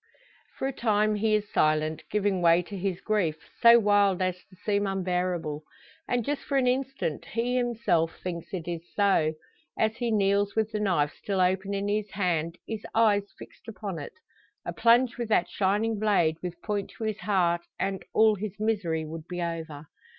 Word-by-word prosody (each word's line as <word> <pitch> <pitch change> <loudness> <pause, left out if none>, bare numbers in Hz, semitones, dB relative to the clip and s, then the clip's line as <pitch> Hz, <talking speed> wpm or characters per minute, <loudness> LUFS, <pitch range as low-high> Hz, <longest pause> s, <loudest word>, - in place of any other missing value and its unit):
For 265 - -1
a 270 - -3
time 215 -3 +2
he 215 +1 +2
is 210 0 -3
silent, 155 0 +2
giving 200 -3 0
way 170 +1 +5
to 200 - -9
his 190 -1 -2
grief 190 -8 0 0.2
so 235 0 +9
wild 205 -3 +3
as 185 -1 -1
to 185 - -20
seem 205 +1 0
unbearable. 180 -5 -1 0.5
And 245 -2 0
just 290 0 -2
for 280 - -1
an 260 - +3
instant 255 - -1
he 240 +2 -1
himself 225 -10 0
thinks 170 -2 -5
it 175 -3 -4
so, 190 -6 +3 0.4
as 220 0 +1
he 240 -2 -1
kneels 200 -1 +2
with 220 0 0
the 215 - -2
knife 170 -8 +1
still 195 -2 -3
open 190 +2 +1
in 200 +1 -2
his 210 0 -1
hand, 170 -4 -1
his 220 -1 -5
eyes 205 -3 +3
fixed - - -14
upon 205 -6 -5
it. 145 - -8 0.5
A - - -3
plunge 240 +1 +3
with 235 -2 -3
that 185 -5 +3
shining 210 +3 0
blade 185 -7 +2
with 180 -1 -6
point 205 -2 -2
to - - -6
his 215 -1 -2
heart, 175 -4 +1 0.2
and 195 -1 -2
all 220 0 +5
his 210 0 -6
misery 190 -8 0
would 160 +1 -8
be 180 0 -5
over! 165 -3 -4
200 Hz, 180 wpm, -27 LUFS, 175-215 Hz, 0.5 s, so